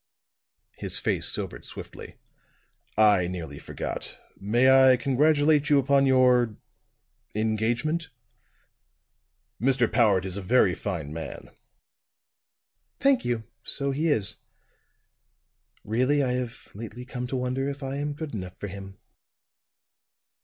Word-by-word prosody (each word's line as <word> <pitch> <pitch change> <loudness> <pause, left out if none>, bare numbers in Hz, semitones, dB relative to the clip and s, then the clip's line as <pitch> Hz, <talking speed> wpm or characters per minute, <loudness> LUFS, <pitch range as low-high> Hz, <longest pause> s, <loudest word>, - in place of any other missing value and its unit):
His - - -1
face - - 0
sobered - - -4
swiftly. - - -10 0.8
"I 105 -4 +5
nearly 80 -5 -6
forgot. - - -6 0.2
May 120 +6 +2 0.2
I 130 - +6
congratulate 145 +3 +3
you 145 - +5
upon 140 0 +3
your 125 -4 +4 0.8
engagement? 115 +9 -1 1.5
Mr. 125 -1 +3
Powart 105 -6 +3
is 95 0 -4
a - - -4
very 100 -2 +3
fine 85 -7 -4
man." 80 -4 -7 1.5
"Thank 275 -2 +3
you; 120 -2 -1 0.2
so 140 +3 -2
he 150 +5 -1
is. 110 -8 +2 1.5
Really, 130 +6 +1
I 130 - 0
have 125 -1 -4
lately 115 +3 -8
come 125 -1 -5
to 130 - -4
wonder 130 +2 -1
if 140 0 -7
I 135 +1 -3
am 145 +1 -2
good 155 -2 -6
enough 90 -4 -6
for 105 - -5
him." 95 0 -9
125 Hz, 115 wpm, -26 LUFS, 105-140 Hz, 1.5 s, I